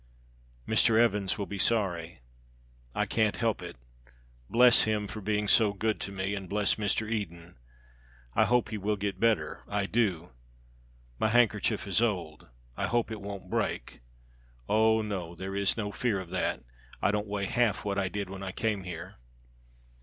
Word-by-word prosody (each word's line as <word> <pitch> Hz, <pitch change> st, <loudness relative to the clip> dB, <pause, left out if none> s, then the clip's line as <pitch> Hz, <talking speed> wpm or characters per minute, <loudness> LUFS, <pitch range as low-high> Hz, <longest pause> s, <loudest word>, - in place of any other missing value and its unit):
"Mr. 110 Hz, -1 st, +4 dB
Evans 105 Hz, -5 st, +2 dB
will 100 Hz, -, -2 dB
be 100 Hz, 0 st, -6 dB
sorry. 90 Hz, -, 0 dB, 0.7 s
I -, -, +1 dB
can't 110 Hz, -2 st, +1 dB
help 115 Hz, -3 st, 0 dB
it. -, -, -7 dB, 0.7 s
Bless 125 Hz, 0 st, +6 dB
him 105 Hz, -1 st, 0 dB
for 110 Hz, +1 st, -7 dB
being 105 Hz, +1 st, 0 dB
so 105 Hz, -1 st, +5 dB
good 110 Hz, +2 st, -1 dB
to 100 Hz, -, -4 dB
me; 95 Hz, +1 st, -2 dB
and 95 Hz, -3 st, -5 dB
bless 105 Hz, -1 st, +2 dB
Mr. 110 Hz, +1 st, -1 dB
Eden. 90 Hz, -6 st, -4 dB, 0.8 s
I -, -, +4 dB
hope 125 Hz, -1 st, +2 dB
he 110 Hz, -, -4 dB
will 105 Hz, +2 st, 0 dB
get 100 Hz, 0 st, -3 dB
better, 115 Hz, -2 st, +1 dB
I 100 Hz, -1 st, -1 dB
do. 95 Hz, -, 0 dB, 0.9 s
My -, -, +3 dB
handkerchief 110 Hz, -2 st, +2 dB
is 100 Hz, +1 st, +1 dB
old, 90 Hz, -9 st, -2 dB, 0.3 s
I -, -, -1 dB
hope 120 Hz, -1 st, 0 dB
it 110 Hz, -2 st, -5 dB
won't 100 Hz, -1 st, -7 dB
break; -, -, -2 dB, 0.7 s
oh, 110 Hz, +1 st, +3 dB
no! 90 Hz, -5 st, -4 dB
there 95 Hz, +3 st, -5 dB
is 100 Hz, +2 st, +2 dB
no 105 Hz, -2 st, -2 dB
fear 110 Hz, -3 st, 0 dB
of 90 Hz, -2 st, -8 dB
that. 95 Hz, -8 st, -1 dB, 0.4 s
I -, -, +2 dB
don't 105 Hz, 0 st, -1 dB
weigh 100 Hz, -1 st, -2 dB
half 115 Hz, -2 st, +1 dB
what 100 Hz, -1 st, 0 dB
I 95 Hz, -1 st, 0 dB
did 100 Hz, 0 st, -3 dB
when 95 Hz, 0 st, -8 dB
I 95 Hz, -1 st, -4 dB
came 105 Hz, -2 st, -2 dB
here. 85 Hz, -3 st, -7 dB
105 Hz, 170 wpm, -29 LUFS, 95-110 Hz, 0.9 s, Bless